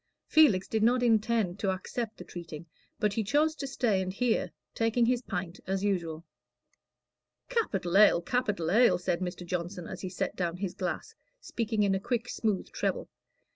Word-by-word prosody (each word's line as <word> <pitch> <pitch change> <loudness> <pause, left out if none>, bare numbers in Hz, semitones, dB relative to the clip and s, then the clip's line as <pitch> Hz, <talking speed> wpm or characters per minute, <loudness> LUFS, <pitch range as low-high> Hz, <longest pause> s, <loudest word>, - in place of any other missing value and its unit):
Felix 240 - +5
did 220 - -1
not 245 +3 +3
intend 220 -4 +2
to 195 - 0
accept 215 +4 -3
the - - -8
treating, 165 -2 -8 0.3
but 210 -1 +1
he 220 - 0
chose 300 +9 +2
to 285 -3 -5
stay 235 -8 +1
and 185 0 -3
hear, 230 +3 0 0.2
taking 230 +1 +2
his 245 0 +1
pint 180 -6 -5
as 190 +1 -1
usual. 170 -5 -1 1.2
"Capital 195 - -1
ale, 205 -4 +7
capital 205 -8 0
ale," 240 +5 +5
said 175 -1 -1
Mr. 180 -1 -5
Johnson, 175 0 -4
as 190 - -7
he 185 - -4
set 180 - -3
down 175 -1 -2
his 185 -1 -3
glass, 180 - -4 0.3
speaking 225 - -1
in 200 -1 +2
a 190 - +1
quick, 240 +3 -2
smooth 210 -4 -1
treble. - - -2
200 Hz, 175 wpm, -29 LUFS, 180-235 Hz, 1.2 s, ale